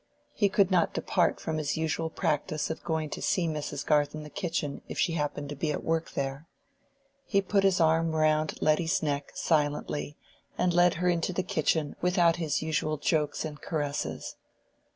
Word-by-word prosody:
He 205 - +2
could 195 0 +3
not 175 -2 +2
depart 175 - +1
from 160 -1 -2
his 145 0 -1
usual 160 0 -1
practice 155 0 -1
of 160 - -6
going 160 -2 -2
to - - -5
see 175 -3 +1
Mrs. 150 -2 -3
Garth 150 -1 +2
in 155 - -6
the 150 - -10
kitchen 165 -5 -3
if - - -7
she 170 - +2
happened 145 -2 -2
to 145 - -5
be 150 +2 -1
at - - -3
work 165 0 -1
there. 140 +3 -3 0.8
He 200 -6 +1
put 195 0 +1
his 195 -2 +3
arm 165 0 +3
round 155 0 +2
Letty's 160 +4 +2
neck 145 -2 -2
silently, 150 -1 0 0.4
and 180 -1 +2
led 175 0 +4
her 180 +3 0
into 175 +1 +1
the 185 - -1
kitchen 155 -2 0
without 180 -2 +3
his 155 -3 -1
usual 155 -1 0
jokes 150 +1 0
and 150 -2 -7
caresses. 145 -3 -3
160 Hz, 180 wpm, -29 LUFS, 150-170 Hz, 0.8 s, led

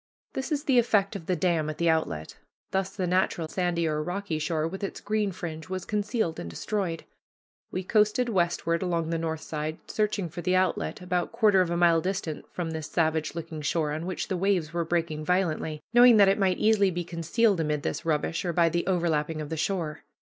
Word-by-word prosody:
This 270 +4 -4
is 290 -1 0
the 265 -5 +4
effect 205 -3 +2
of 170 -5 -7
the 185 - +1
dam 165 -3 +1
at 155 - -5
the 170 - +1
outlet. 160 - 0 0.3
Thus 190 0 0
the 185 - -1
natural 180 -2 +1
sandy 175 -1 0
or 150 -1 0
rocky 180 0 -3
shore, 155 0 0
with 190 +4 -6
its 195 - -4
green 210 -1 0
fringe, 160 -2 -7
was 185 -1 -4
concealed 210 -4 -1
and 85 - -5
destroyed. 170 - -3 0.7
We 185 - -3
coasted 215 +5 +2
westward 170 -4 0
along 170 -3 -1
the 165 - 0
north 160 -1 -3
side, 155 +1 -4
searching 210 -3 -1
for 170 +2 -7
the 180 +2 +1
outlet, 185 0 0
about 180 -1 -1
quarter 205 -4 +4
of 180 - 0
a 170 - 0
mile 170 -1 +4
distant 185 -4 -4
from 170 -2 -3
this 160 -1 -4
savage 160 -2 0
looking 160 -2 -6
shore, 150 +1 0
on 160 +3 -3
which 185 - -3
the 190 - -1
waves 180 -4 +1
were 170 0 0
breaking 160 -2 -1
violently, 160 -3 0
knowing 240 -1 +8
that 200 -1 +7
it 195 +2 +2
might 190 -2 +2
easily 210 -2 +4
be 175 -1 -3
concealed 175 +5 +1
amid 150 -2 -1
this - - -2
rubbish, 165 +2 0
or 175 -2 -1
by 170 0 +4
the 170 +2 -1
overlapping 165 -4 0
of 150 -1 -5
the 160 - -2
shore. 160 -2 -2
175 Hz, 210 wpm, -27 LUFS, 160-195 Hz, 0.7 s, knowing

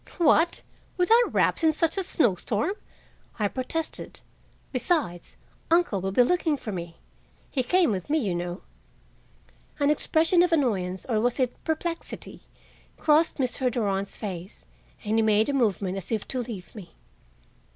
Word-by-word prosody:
"What, 335 0 +3 0.3
without 455 +7 +4
wraps - - +2
and 325 - +4
in - - +1
such 325 +1 0
a 390 - +1
snowstorm?" 230 - +1 0.6
I 210 - +1
protested. 265 +8 -4 0.5
"Besides, 255 - -1 0.3
uncle 330 - +2
will 190 +1 -2
be 245 +6 +5
looking 320 +1 +1
for 225 - -6
me. 170 -3 -6 0.6
He 270 - +1
came 350 +2 +3
with 185 +1 -4
me, 310 - +2
you 210 - 0
know." 175 +1 -4 1.2
An 285 0 +3
expression 320 +3 +3
of 355 0 +3
annoyance, 195 - 0
or 225 -4 +1
was 245 +3 +1
it 255 -2 -1
perplexity, 330 +1 -4 0.6
crossed 310 +2 +3
Mr. 255 -1 0
Durand's 200 -4 -2
face, 185 -3 -7 0.4
and 220 +2 +1
he - - +4
made 215 +1 +3
a - - 0
movement 200 -7 0
as 190 - -10
if 220 -2 -2
to 255 - -2
leave 220 -7 -8
me. 185 -7 -11
245 Hz, 150 wpm, -26 LUFS, 200-320 Hz, 1.2 s, be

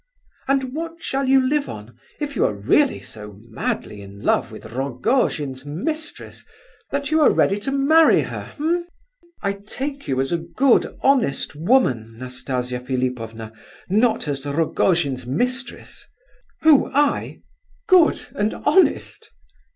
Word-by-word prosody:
And 265 -1 0
what 330 +2 -5
shall 270 0 -1
you 265 -1 +4
live 290 +1 0
on, 105 +2 -9 0.2
if 290 -2 -4
you - - +2
are 105 - 0
really 145 - +2
so 105 -2 -11
madly 105 -1 -4
in 100 0 -12
love - - +1
with - - -11
Rogojin's 135 - -1
mistress, 305 - -5 0.5
that 280 +1 -3
you 315 0 +3
are 295 - +7
ready 200 +1 +2
to 245 +6 -3
marry 310 +4 +5
her—eh?" 340 +4 -3 0.6
"I 200 - 0
take 270 +8 -6
you 130 -1 0
as 135 0 -1
a 170 - +1
good, 235 +10 +1
honest 260 - +2
woman, 140 - +1
Nastasia 125 0 -4
Philipovna—not 125 - -2
as 140 -2 -3
Rogojin's 145 -3 0
mistress." 250 - -3 0.5
"Who? 310 -3 +5
I?—good 315 - +1
and 210 +1 -1
honest?" 365 +6 +1
200 Hz, 125 wpm, -22 LUFS, -, 0.6 s, are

